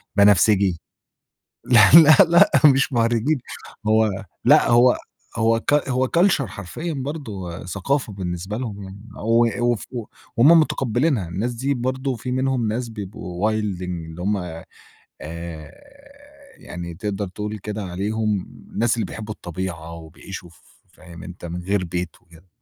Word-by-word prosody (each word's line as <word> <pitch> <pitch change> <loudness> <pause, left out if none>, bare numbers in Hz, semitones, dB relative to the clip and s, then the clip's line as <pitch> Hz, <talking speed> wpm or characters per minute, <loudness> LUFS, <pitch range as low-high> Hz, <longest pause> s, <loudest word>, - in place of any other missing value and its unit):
بنفسجي. 100 -3 +4 0.8
لا، 115 -4 +6
لا، 155 -1 +9
لأ، 180 +5 +6
مش 135 -1 +5
مهرّجين 120 +5 +1 0.5
هو 110 -2 +2 0.2
لأ - - +5
هو 120 +1 +5 0.4
هو 115 0 +2
كال 145 +4 +2
هو 130 0 +1
culture 175 -5 +4
حرفيًا 100 - -6
برضه 115 - -6
ثقافة 110 +7 -2
بالنسبة 95 +1 -5
لهم 110 -5 -5
يعني، 95 +1 -10 0.3
و 115 +1 +4 0.3
وف 115 - -5
و 120 -3 -4 0.3
وهُم 160 +8 +7
متقّبلينها. 125 - 0
الناس 110 +8 -2
دي 135 +4 -1
برضه 130 +1 -2
في 125 +3 -6
منهم 130 -3 0
ناس 120 +2 -2
بيبقوا 95 -4 -6
وايلدينج، 90 -6 -2
اللي 80 +2 -9
هُم 105 +3 0 0.9
آآ 80 0 -8 0.9
يعني 85 -1 -8
تقدر 100 +2 -4
تقول 105 +3 -5
كده 105 +1 -5
عليهم 105 +3 -1 0.3
الناس 120 +1 +1
اللي 115 - -2
بيحبوا 105 -1 -7
الطبيعة، 85 -3 -6
وبيعيشوا 85 +2 -10
ف 85 - -22 0.3
فاهم 85 -1 -13
أنت؟ 90 -1 -10
من 85 +1 -6
غير 95 0 0
بيت 90 0 -4
وكِده. 85 +1 -20
105 Hz, 140 wpm, -22 LUFS, 90-125 Hz, 0.9 s, لا